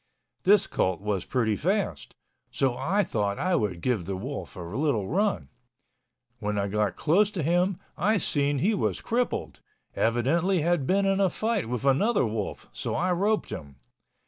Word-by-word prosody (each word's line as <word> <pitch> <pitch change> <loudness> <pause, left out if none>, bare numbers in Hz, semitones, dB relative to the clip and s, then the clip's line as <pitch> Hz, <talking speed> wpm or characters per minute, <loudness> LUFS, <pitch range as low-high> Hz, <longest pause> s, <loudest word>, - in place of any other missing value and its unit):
This 200 +1 +6
colt 95 - 0
was 100 -2 -2
pretty 115 -5 +1
fast. - - -1 0.3
So 130 -3 0
I 175 +11 +1
thought 100 - -1
I 185 0 +1
would 100 - -1
give 115 -7 0
the 95 +1 -3
wolf 130 +6 -6
a - - -8
little 110 - -1
run. 160 - 0 0.9
When 105 -1 -2
I 100 0 0
got 105 -2 0
close 195 +7 +3
to 190 -6 -3
him, 175 +4 +2 0.2
I 215 +1 +2
seen 145 -5 0
he 195 +11 +2
was 205 - 0
crippled, 245 +2 -2 0.3
evidently 160 +11 +2
had 165 -4 +1
been 195 +1 +2
in 195 0 +2
a 195 -2 +4
fight 220 - -1
with 125 +2 -3
another 175 - +3
wolf, 110 -2 -4
so - - -3
I 185 +1 +1
roped 205 +5 +1
him. 70 -2 -7
140 Hz, 170 wpm, -27 LUFS, -, 0.9 s, This